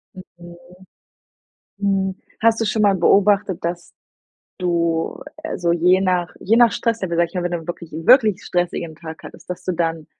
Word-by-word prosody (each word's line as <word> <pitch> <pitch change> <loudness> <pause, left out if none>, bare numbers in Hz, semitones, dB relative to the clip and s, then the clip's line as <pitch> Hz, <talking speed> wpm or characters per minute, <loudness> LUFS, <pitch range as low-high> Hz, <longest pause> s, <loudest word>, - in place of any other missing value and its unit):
Mhm. 175 -2 -13 1.2
Hm, 195 -1 0 0.3
hast 225 0 +3
du 225 - +1
schon 215 0 0
mal 200 -2 +4
beobachtet, 195 +1 +2
dass 170 +1 -4 0.7
du, 170 -2 -1 0.2
äh, 320 - -4
so 170 -1 0
je 180 +2 +3
nach 180 -2 0
je 225 +4 +2
nach 240 -2 +5
Stress-Level, 210 -7 -1
sage 170 0 +2
ich - - -24
mal, 180 - -1
wenn 175 - -2
du 175 - -1
dann 165 - -12
wirklich, 170 -1 -7
wirklich 215 - +4
stressigen 175 -2 -2
Tag 160 -1 -10
hattest, - - -13
dass 180 - -6
du 185 - -1
dann 165 -2 -2
180 Hz, 175 wpm, -20 LUFS, 170-200 Hz, 1.2 s, nach